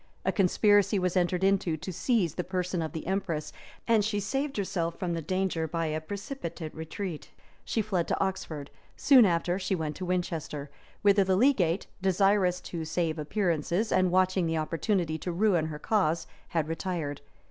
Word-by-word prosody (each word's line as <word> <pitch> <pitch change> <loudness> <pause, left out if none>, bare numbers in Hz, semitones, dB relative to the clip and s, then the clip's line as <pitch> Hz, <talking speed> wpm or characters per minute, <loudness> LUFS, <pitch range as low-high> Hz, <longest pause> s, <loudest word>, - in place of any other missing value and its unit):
A - - +3
conspiracy 205 +1 +3
was 180 -1 0
entered 180 0 +1
into 190 -4 +2
to 180 +4 -6
seize 190 - +1
the 180 - -3
person 180 -1 -2
of 160 - -3
the 160 - -6
empress, 190 -5 -2 0.3
and 225 -2 +4
she 210 0 0
saved 270 +7 -2
herself 180 -4 -2
from 180 -3 -2
the 165 - -2
danger 185 -1 -1
by 165 +1 -2
a 155 0 -2
precipitate 175 - -6
retreat. 160 +1 -6 0.3
She 220 - -1
fled 190 -5 -1
to - - -1
Oxford: 160 -7 -3 0.3
soon 265 -5 +7
after 175 +1 0
she 190 0 0
went 155 -3 -3
to 185 - -4
Winchester, 165 -5 -3 0.3
whither 200 -1 +5
the 190 0 +2
legate, 195 - +3 0.2
desirous 190 -1 +3
to 170 -2 -5
save 160 0 -1
appearances, 175 +4 0
and 185 -1 +3
watching 185 -1 +2
the 165 0 0
opportunity 165 +1 -1
to 180 - -3
ruin 175 -3 +2
her 155 -1 -5
cause, 165 -2 +1 0.2
had 160 -3 -1
retired. 165 -4 -3
180 Hz, 170 wpm, -29 LUFS, 165-195 Hz, 0.3 s, soon